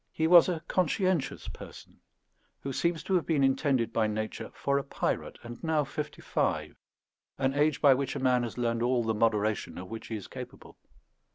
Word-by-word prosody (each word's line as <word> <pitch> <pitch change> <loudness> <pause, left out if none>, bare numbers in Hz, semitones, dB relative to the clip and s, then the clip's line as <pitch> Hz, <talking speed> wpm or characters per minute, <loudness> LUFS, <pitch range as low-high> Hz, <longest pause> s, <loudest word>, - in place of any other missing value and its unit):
He 160 - -1
was 175 +2 +7
a 165 -2 -2
conscientious 185 -3 0
person, - - -11 0.6
who 135 - -4
seems 170 +2 0
to 190 - -2
have 180 -3 +2
been 150 -4 +2
intended 135 -4 +1
by 110 -2 +2
nature 110 0 -4
for 140 0 +1
a - - -4
pirate, 140 - -3
and 120 0 -9
now 160 -2 +2
fifty 150 +1 -6
five, - - -1 0.6
an 135 0 +1
age 145 0 +1
by 140 -3 +7
which 130 0 -2
a - - -2
man 125 -1 +3
has 120 0 -5
learned 115 -1 0
all 120 0 +2
the 110 0 0
moderation 110 -1 0
of 90 +1 -8
which 115 0 -7
he 115 - -4
is 105 - -6
capable. - - -10
135 Hz, 190 wpm, -29 LUFS, 115-155 Hz, 0.6 s, was